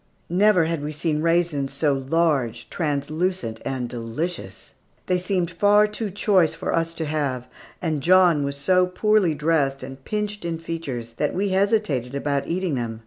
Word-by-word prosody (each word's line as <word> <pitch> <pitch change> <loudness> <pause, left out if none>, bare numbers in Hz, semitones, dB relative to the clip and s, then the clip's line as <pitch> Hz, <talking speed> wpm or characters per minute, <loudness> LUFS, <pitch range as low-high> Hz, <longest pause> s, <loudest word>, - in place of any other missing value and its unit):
Never 185 -2 +4
had 165 -2 -2
we 150 - -3
seen 150 0 -1
raisins 165 -4 +1
so 145 +1 +1
large, 135 -3 0
translucent, 155 -3 -2
and 130 -2 -3
delicious. 120 +9 -5 0.3
They 180 -1 +1
seemed 180 -2 -1
far 205 +4 +4
too 210 0 -4
choice 190 -4 +2
for - - -3
us 165 0 -1
to 160 - -3
have, 140 -5 -2 0.4
and 155 -4 -1
John 175 -2 +5
was 140 0 -3
so 180 +6 +3
poorly 190 -2 +2
dressed 145 -3 0
and 135 +1 -9
pinched 210 +1 -3
in 170 -1 -2
features 145 -9 -5
that 150 - -1
we 200 +2 0
hesitated 190 - +1
about 140 0 -1
eating 180 -1 -1
them. 115 -3 -3
165 Hz, 160 wpm, -23 LUFS, 140-185 Hz, 0.4 s, John